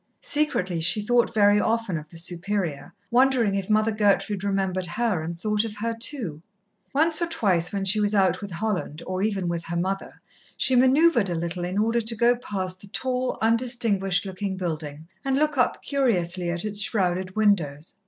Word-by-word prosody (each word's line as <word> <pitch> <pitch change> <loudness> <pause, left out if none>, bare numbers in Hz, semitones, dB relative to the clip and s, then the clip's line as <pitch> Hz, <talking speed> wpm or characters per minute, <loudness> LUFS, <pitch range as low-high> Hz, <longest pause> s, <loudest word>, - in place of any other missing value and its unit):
Secretly 290 - 0
she 180 +6 +1
thought 240 +3 +2
very 205 -2 +4
often 225 -4 0
of 155 -1 -6
the 165 - -12
Superior, 175 -1 -2 0.2
wondering 245 -4 +3
if 195 0 -2
Mother 215 +1 +3
Gertrude 205 -1 +1
remembered 190 -2 -1
her 210 -2 -1
and 170 +1 -6
thought 210 +2 +1
of 220 -2 -5
her 230 +2 -2
too. 225 - -2 0.5
Once 320 +4 +2
or 340 - +1
twice 185 - +1
when 200 -2 -2
she 200 +3 +3
was 210 0 +1
out 185 -2 +2
with 200 - -6
Holland, 180 -4 -3
or 185 0 -3
even 200 -3 -1
with 170 -1 -3
her 170 0 -3
mother, 190 +3 -3 0.4
she 260 - +3
manoeuvred 260 - +4
a 175 - -1
little 170 +2 -3
in 180 +2 -3
order 230 +3 +2
to 225 +1 -2
go 240 +2 +3
past 185 -6 -4
the 200 - -12
tall, 255 +4 -2
undistinguished 225 -5 +1
looking 190 0 -4
building, 155 -3 -5 0.2
and 270 -1 0
look 305 0 +1
up 250 - +1
curiously 185 -10 0
at 175 +3 -3
its 205 -1 -3
shrouded 185 -3 -1
windows. 170 -8 +1
200 Hz, 185 wpm, -25 LUFS, 180-230 Hz, 0.5 s, very